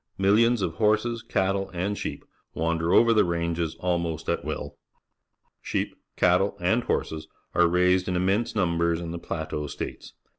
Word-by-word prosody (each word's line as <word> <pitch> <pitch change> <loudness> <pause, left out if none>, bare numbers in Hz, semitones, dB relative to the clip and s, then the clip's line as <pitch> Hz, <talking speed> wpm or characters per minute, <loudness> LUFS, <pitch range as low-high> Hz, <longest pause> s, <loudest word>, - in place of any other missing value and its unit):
INlillions 110 +3 +4
of 85 -2 -3
horseSj_catUe,^Jid_sheep 100 -3 -1 0.3
wander 85 +1 0
over 115 0 +6
the 110 - +5
ranges 85 -1 -1
almost 85 -3 -2
at - - 0
will. - - -5 0.8
Sheep, - - -2 0.2
cattle, 95 +3 +3
and 95 +7 +2
horses 80 0 -2 0.3
are 85 0 +4
raised 90 +1 +3
in 90 - -1
immense 95 +7 +1
numbers 85 -3 +1
in 85 -1 -5
the 85 - -5
Plateau 80 -3 -4
States. - - -7
90 Hz, 135 wpm, -26 LUFS, 85-100 Hz, 0.8 s, over